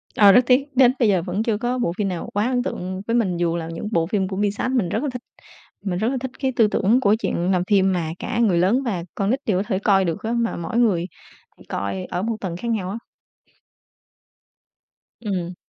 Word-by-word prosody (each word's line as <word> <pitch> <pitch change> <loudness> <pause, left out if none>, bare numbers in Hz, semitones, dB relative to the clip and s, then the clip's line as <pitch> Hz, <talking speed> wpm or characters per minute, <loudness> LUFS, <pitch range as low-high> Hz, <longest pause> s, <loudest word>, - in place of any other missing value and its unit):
Ờ, 205 -2 +7
rất 245 - +7
tiếc, 255 +2 +4
đến 255 -1 +6
bây 235 - +4
giờ 185 -4 +3
vẫn 190 +4 -2
chưa 225 -3 0
có 245 +3 -1
bộ 170 -8 0
phim 205 - 0
nào 180 -3 -4
quá 205 +3 +1
ấn 250 -1 0
tượng 185 -2 -4
với 230 - +1
mình 190 -7 +1
dù 170 -1 0
là 165 -1 -4
những 170 - -5
bộ 165 -6 +2
phim 195 0 0
của 190 0 -5
Pixar, 205 +5 -1
mình 230 -10 +1
rất 225 +9 -1
là 290 - -1
thích, 250 - -5 0.6
mình 180 -2 -1
rất 220 - 0
là 265 - -1
thích 260 -1 -4
cái 265 -1 0
tư 220 -2 +5
tưởng 220 +3 +2
của 210 -2 +4
chuyện 180 -4 -1
làm 180 -1 +2
phim 195 -2 +4
mà 170 -3 -1
cả 235 - -3
người 210 -7 +3
lớn 200 +10 +2
và 195 -9 -2
con 200 0 -1
nít 260 +4 +1
đều 190 -4 +1
có - - 0
thể 190 -4 0
coi 195 -2 +3
được 165 +2 -3
á, 225 - -2
mà 235 -1 0
mỗi 170 +7 -4
người 200 -8 +2 0.5
thì - - -16
coi 100 -1 -3
ở 180 - -3
một 225 +3 -1
tầng 175 -3 -4
khác 235 - -6
nhau 195 -5 -2
á. 205 - -4 2.2
Ừm. 185 -6 -3
205 Hz, 245 wpm, -22 LUFS, 180-235 Hz, 2.2 s, Ờ